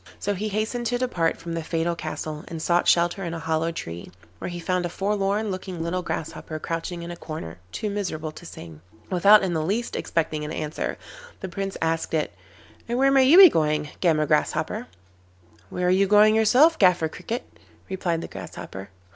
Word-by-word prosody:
So 205 - -1
he 210 +3 -3
hastened 220 +3 -2
to 245 +2 0
depart 180 -10 0
from 170 0 -6
the 165 - -2
fatal 165 +1 -1
castle, 155 -1 -5
and 165 - -6
sought 175 +2 +1
shelter 175 +3 +3
in 170 -1 -3
a - - -5
hollow 160 +1 0
tree, 85 - -7 0.3
where - - -4
he 175 0 -6
found 180 +1 -1
a 175 - -2
forlorn 200 +3 -1
looking 185 -2 -5
little 180 +2 -1
Grasshopper 160 -1 -5
crouching 165 +2 -4
in 170 - -6
a - - -6
corner, 155 - -7
too 215 - -3
miserable 180 -7 -3
to 155 - -13
sing. 80 - -10 0.3
Without 200 +3 +6
in 185 -2 0
the 160 - 0
least 215 +8 -2
expecting 155 -2 -1
an 150 - -5
answer, 155 -1 -3 0.4
the 190 - -5
Prince 195 +2 -4
asked 165 0 -1
it: 150 - -1 0.6
'And 240 - 0
where 270 +1 +4
may 270 -1 +5
you 300 +7 +7
be 385 -1 +12
going, 150 - +1
Gammer 160 -4 +3
Grasshopper?' 150 0 0 0.8
'Where 180 - -2
are - - +3
you 195 +1 +3
going 210 +2 +6
yourself, 255 +9 +5
Gaffer 180 -4 +4
Cricket?' 225 +10 -5 0.4
replied 175 -3 -2
the - - -6
Grasshopper. 95 +1 -8
175 Hz, 190 wpm, -25 LUFS, 160-205 Hz, 0.8 s, be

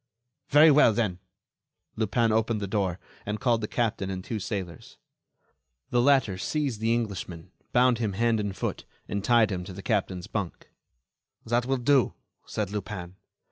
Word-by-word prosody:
"Very 150 +2 +7
well, 140 -6 +6
then." 100 -6 -1 0.8
Lupin 115 +1 +1
opened 110 0 +1
the 100 - -3
door 95 -3 -1 0.3
and 105 +1 -3
called 120 -2 +2
the 105 - -2
captain 110 -5 -1
and 95 -1 -4
two 110 +1 -4
sailors. 95 -6 -6 0.9
The 120 - +3
latter 125 -8 +3
seized 140 -2 -1
the 115 +1 +1
Englishman, 95 -6 -3 0.2
bound 125 -1 +4
him 110 -4 -1
hand 115 +2 +1
and 100 -2 -3
foot, - - -3 0.2
and 100 -1 -3
tied 115 -2 +4
him 90 -2 -3
to 95 - -8
the 100 +1 -9
captain's 90 -2 -1
bunk. 100 -5 -5 0.7
"That 120 +2 0
will 135 0 +1
do," 130 -1 +3 0.3
said 105 -3 -3
Lupin. 95 -3 -5
110 Hz, 160 wpm, -27 LUFS, 95-120 Hz, 0.9 s, Very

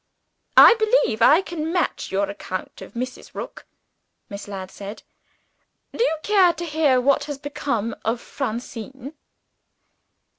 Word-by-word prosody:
"I - - +11
believe 435 - +2
I 325 +6 +6
can 325 -3 -4
match 355 0 -1
your 195 +1 +1
account 185 -2 -6
of - - -11
Mrs. 255 +2 -6
Rook," - - -8 0.6
Miss 200 0 -8
Ladd 190 -2 -7
said. 200 +2 -9 0.9
"Do 465 - +1
you 320 -10 +1
care 385 -4 +4
to 345 +1 -6
hear 300 -5 +2
what 275 +2 +2
has 290 -2 -5
become 275 -6 -3
of 230 +2 -1
Francine?" 255 +2 -6
270 Hz, 135 wpm, -23 LUFS, 220-320 Hz, 0.9 s, I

